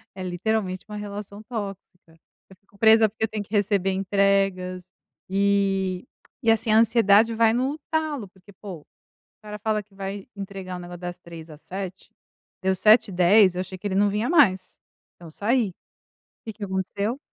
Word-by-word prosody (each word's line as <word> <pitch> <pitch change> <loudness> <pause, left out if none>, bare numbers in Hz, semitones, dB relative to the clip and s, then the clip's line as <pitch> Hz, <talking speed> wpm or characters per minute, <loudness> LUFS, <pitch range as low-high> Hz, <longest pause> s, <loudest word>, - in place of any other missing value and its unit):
é 185 - -6
literalmente 185 +1 -2
uma 210 - -6
relação 205 0 -7
tóxica. 195 -7 -8 0.4
Eu 190 - -15
fico 200 0 -26
presa 220 0 +6
porque 220 +1 -6
eu - - -4
tenho 210 -1 -4
que 205 - -17
receber 200 -2 +1
entregas, 195 -2 +1 0.5
eh, - - -9 1.1
e, 225 - +5
assim, 225 0 +1
a 215 - +5
ansiedade 225 -1 +4
vai 225 0 +3
no 265 +5 -1
talo, 305 -9 -1
porque, 190 +2 -20
pô, 190 -4 -9
o - - -28 0.6
cara 210 0 -8
fala 215 0 0
que 200 0 -30
vai 195 0 -6
entregar 195 -2 -7
o - - -8
negócio 175 0 -9
das 175 0 -6
15h 165 -2 -11
às 150 -1 -13
19h, 190 +2 -7 0.5
deu 190 0 +1
19:10h 195 -2 +5
eu 180 - -1
achei 185 0 -7
que 205 - -5
ele 190 - -2
não 205 +1 +3
vinha 215 +6 -1
mais. 230 - +3 0.4
Então 170 -2 -13
saí. 215 0 0 0.7
Que 220 - -4
que 210 - -9
aconteceu? 200 +6 -2
200 Hz, 175 wpm, -24 LUFS, 185-220 Hz, 1.1 s, presa